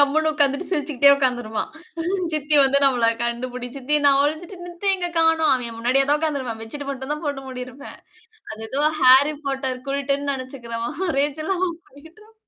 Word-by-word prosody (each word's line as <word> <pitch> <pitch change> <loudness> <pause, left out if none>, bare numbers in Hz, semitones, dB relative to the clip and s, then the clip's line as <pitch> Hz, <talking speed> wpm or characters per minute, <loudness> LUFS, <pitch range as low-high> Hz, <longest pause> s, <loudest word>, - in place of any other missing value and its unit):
கம்முனு 310 +3 +3
உட்கார்ந்துட்டு 285 +3 +1
சிரிச்சுகிட்டே 285 -4 +3
உட்கார்ந்துருப்பான். 245 -5 -1 0.6
சித்தி 305 0 -1
வந்து 270 +1 +3
நம்மள 245 -4 +4
கண்டுபிடி 245 +1 -3
சித்தி. 280 +3 0
நான் 275 0 +5
ஒழிஞ்சிட்டு 315 +6 -3
சித்திய 385 +3 0
எங்க 355 -1 -3
காணோம். 325 -1 +4
அவன் 235 -3 -4
முன்னாடியே 255 +4 +2
தான் 295 +1 +3
உட்கார்ந்து 300 -3 -1
இருப்பான் 230 -3 -5
பெட்சிட்டு 280 +5 -7
மட்டும்தான் 285 +4 -5
போட்டு 275 -2 -4
மூடியிருப்பேன். 255 +2 -9 0.5
அது 220 +1 -7
ஏதோ 280 +2 -1 0.2
ஹாரி 265 +4 +6
பாட்டர் 265 -2 -3
குல்டன்னு 280 +1 -1
நெனைச்சுக்கிறவன் 255 +1 -6 0.2
ரேஞ்சல 310 +6 -1
அவன் 355 -3 -1
பண்ணிட்டு 290 +4 -16
இருப்பான். 430 +1 -20
280 Hz, 160 wpm, -22 LUFS, 255-305 Hz, 0.6 s, ஹாரி